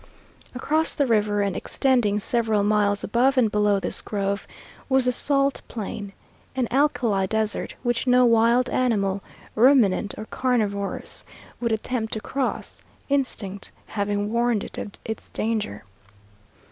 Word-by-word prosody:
Across 310 Hz, +5 st, 0 dB
the 285 Hz, -, +2 dB
river, 210 Hz, -3 st, +2 dB
and 200 Hz, -2 st, -1 dB
extending 245 Hz, -7 st, +1 dB
several 220 Hz, -1 st, +1 dB
miles 205 Hz, -1 st, +2 dB
above 255 Hz, +5 st, +2 dB
and 230 Hz, -4 st, +3 dB
below 210 Hz, -1 st, +2 dB
this -, -, -2 dB
grove, 200 Hz, -1 st, -2 dB, 0.4 s
was 265 Hz, -1 st, +4 dB
the 250 Hz, -, +3 dB
salt 275 Hz, +2 st, +1 dB
plain 205 Hz, -2 st, -6 dB, 0.4 s
an 255 Hz, -2 st, 0 dB
alkali 245 Hz, -8 st, +2 dB
desert 220 Hz, 0 st, -2 dB
which 240 Hz, 0 st, -1 dB
no 250 Hz, 0 st, +5 dB
wild 235 Hz, +2 st, +4 dB
animal, 200 Hz, -6 st, +1 dB, 0.3 s
ruminant 225 Hz, -5 st, +4 dB
or 215 Hz, -, -6 dB
carnivorous, 215 Hz, -6 st, -2 dB, 0.4 s
would 235 Hz, -1 st, -1 dB
attempt 220 Hz, +1 st, -2 dB
to 220 Hz, -, -1 dB
cross, 265 Hz, +4 st, -3 dB, 0.3 s
instinct 220 Hz, -8 st, -1 dB
having 205 Hz, 0 st, -2 dB
warned 235 Hz, -2 st, +1 dB
it -, -, -6 dB
of 205 Hz, -, -5 dB
its 220 Hz, -, -6 dB
danger. 215 Hz, -, -2 dB
220 Hz, 135 wpm, -24 LUFS, 205-250 Hz, 0.4 s, no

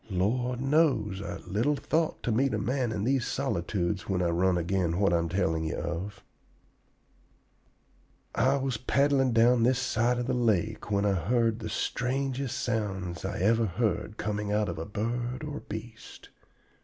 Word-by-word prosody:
Lord 120 Hz, +7 st, 0 dB
knows 135 Hz, -9 st, +2 dB
I 100 Hz, -, -5 dB
little 115 Hz, +10 st, +1 dB
thought 160 Hz, +3 st, -1 dB
to 120 Hz, -, 0 dB
meet 130 Hz, +5 st, +2 dB
a -, -, 0 dB
man 125 Hz, -2 st, -1 dB
in 100 Hz, -2 st, -2 dB
these 130 Hz, +1 st, +1 dB
solitudes 100 Hz, -7 st, -2 dB
when 95 Hz, -2 st, +1 dB
I 85 Hz, -, +2 dB
run 90 Hz, +2 st, +2 dB
agin 85 Hz, 0 st, 0 dB
what 100 Hz, -3 st, +3 dB
I 85 Hz, -, +4 dB
am 85 Hz, 0 st, -2 dB
telling 80 Hz, -3 st, 0 dB
ye 80 Hz, -, -2 dB
of. 90 Hz, +5 st, -5 dB, 2.1 s
"I 130 Hz, +5 st, +3 dB
was 135 Hz, -3 st, -1 dB
paddling 135 Hz, +2 st, +2 dB
down 120 Hz, +1 st, +4 dB
this 125 Hz, +2 st, +3 dB
side 120 Hz, -1 st, +1 dB
of 120 Hz, -, -1 dB
the -, -, -1 dB
lake 110 Hz, -4 st, 0 dB
when 100 Hz, 0 st, +1 dB
I 100 Hz, -, +3 dB
heard 115 Hz, +4 st, +1 dB
the 110 Hz, -2 st, -5 dB
strangest 130 Hz, +4 st, -2 dB
sounds 95 Hz, -7 st, -2 dB
I 95 Hz, -1 st, -3 dB
ever 115 Hz, +3 st, +3 dB
heard 105 Hz, +1 st, -1 dB
coming 105 Hz, -1 st, -2 dB
out 105 Hz, -1 st, +1 dB
of 85 Hz, -, -4 dB
a 80 Hz, -, -4 dB
bird 120 Hz, +5 st, -3 dB
or 150 Hz, -1 st, -4 dB
beast. 110 Hz, +1 st, -9 dB
110 Hz, 170 wpm, -28 LUFS, 95-125 Hz, 2.1 s, I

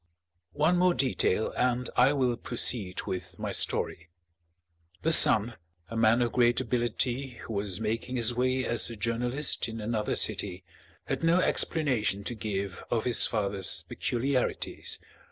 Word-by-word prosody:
One 155 Hz, +5 st, +2 dB
more 180 Hz, -1 st, +3 dB
detail 120 Hz, -5 st, 0 dB
and 125 Hz, 0 st, 0 dB
I 125 Hz, +3 st, +5 dB
will 130 Hz, -4 st, +1 dB
proceed 115 Hz, -5 st, -3 dB
with 90 Hz, -2 st, -6 dB
my -, -, -4 dB
story. 80 Hz, 0 st, 0 dB, 0.9 s
The 165 Hz, -, +2 dB
son, 115 Hz, -5 st, +6 dB, 0.3 s
a 115 Hz, -, -7 dB
man 115 Hz, +2 st, +3 dB
of 120 Hz, -, -1 dB
great 120 Hz, -1 st, +3 dB
ability 125 Hz, +1 st, -1 dB
who 115 Hz, -, -7 dB
was 100 Hz, -2 st, -1 dB
making 115 Hz, +3 st, -3 dB
his 120 Hz, -1 st, +2 dB
way 130 Hz, +1 st, 0 dB
as 120 Hz, 0 st, +1 dB
a 115 Hz, -, -7 dB
journalist 120 Hz, +5 st, 0 dB
in 115 Hz, 0 st, -7 dB
another 110 Hz, 0 st, -2 dB
city, 90 Hz, -2 st, -1 dB, 0.4 s
had -, -, -3 dB
no 165 Hz, +2 st, +4 dB
explanation 125 Hz, -, +2 dB
to 120 Hz, -, -3 dB
give 100 Hz, -4 st, -4 dB
of 115 Hz, -2 st, 0 dB
his 125 Hz, -2 st, +5 dB
father's 100 Hz, -4 st, -1 dB
peculiarities. 125 Hz, +1 st, -2 dB
120 Hz, 145 wpm, -28 LUFS, 105-130 Hz, 0.9 s, son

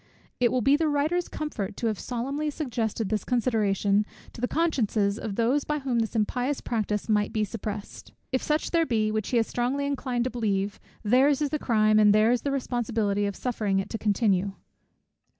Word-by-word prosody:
It 240 Hz, -1 st, +3 dB
will 250 Hz, -2 st, +1 dB
be 275 Hz, +4 st, +5 dB
the 315 Hz, +1 st, +1 dB
writer's 305 Hz, +4 st, +1 dB
comfort 225 Hz, -11 st, -4 dB
to -, -, -3 dB
have 215 Hz, -3 st, 0 dB
solemnly 275 Hz, +5 st, -2 dB
suggested 230 Hz, -8 st, -2 dB
this 215 Hz, -3 st, -1 dB
consideration, 210 Hz, -4 st, +1 dB, 0.3 s
to -, -, -10 dB
the 250 Hz, -, +1 dB
consciences 225 Hz, -11 st, +1 dB
of 205 Hz, -3 st, -4 dB
those 245 Hz, +6 st, +2 dB
by 300 Hz, -, -1 dB
whom 265 Hz, -4 st, -1 dB
this 225 Hz, 0 st, -2 dB
impious 250 Hz, +6 st, 0 dB
practice 210 Hz, -3 st, -2 dB
might 210 Hz, -2 st, +1 dB
be 215 Hz, -, 0 dB
suppressed: 210 Hz, -1 st, -6 dB, 0.2 s
If 260 Hz, -, +1 dB
such 300 Hz, +1 st, -1 dB
there 330 Hz, -2 st, +2 dB
be, 215 Hz, -3 st, +1 dB
which 215 Hz, -1 st, -2 dB
he 245 Hz, -, +2 dB
is 225 Hz, -, +3 dB
strongly 255 Hz, +5 st, -1 dB
inclined 260 Hz, -4 st, -1 dB
to 255 Hz, -, -2 dB
believe, 205 Hz, -4 st, -1 dB, 0.2 s
their's 260 Hz, +6 st, +4 dB
is 295 Hz, -2 st, -1 dB
the 305 Hz, -, -1 dB
crime, 215 Hz, -4 st, +3 dB
and 210 Hz, -1 st, +6 dB
their's 230 Hz, +3 st, +4 dB
the 285 Hz, -, -2 dB
responsibility 230 Hz, -6 st, 0 dB
of 200 Hz, -, -4 dB
suffering 215 Hz, -6 st, -1 dB
it 195 Hz, -, -2 dB
to 225 Hz, -, -3 dB
continue. 200 Hz, -2 st, +1 dB
230 Hz, 190 wpm, -27 LUFS, 210-270 Hz, 0.3 s, and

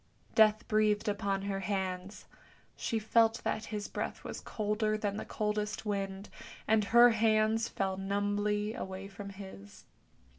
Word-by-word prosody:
Death 215 Hz, -1 st, +4 dB
breathed 215 Hz, -1 st, +2 dB
upon 200 Hz, -1 st, -1 dB
her 200 Hz, -1 st, -2 dB
hands; 190 Hz, 0 st, -3 dB, 0.5 s
she 230 Hz, -, -2 dB
felt 225 Hz, +1 st, +3 dB
that 215 Hz, 0 st, -1 dB
his 210 Hz, -1 st, -4 dB
breath -, -, -4 dB
was -, -, -6 dB
colder 215 Hz, 0 st, -1 dB
than 205 Hz, -1 st, -2 dB
the -, -, -5 dB
coldest 210 Hz, 0 st, -2 dB
wind, 195 Hz, -1 st, -3 dB, 0.4 s
and 215 Hz, -1 st, +3 dB
her 235 Hz, +2 st, +7 dB
hands 220 Hz, 0 st, +2 dB
fell 190 Hz, -1 st, -2 dB
numbly 205 Hz, +2 st, 0 dB
away 190 Hz, -2 st, -6 dB
from 200 Hz, 0 st, -8 dB
his. 190 Hz, -, -11 dB
210 Hz, 140 wpm, -32 LUFS, 195-215 Hz, 0.5 s, her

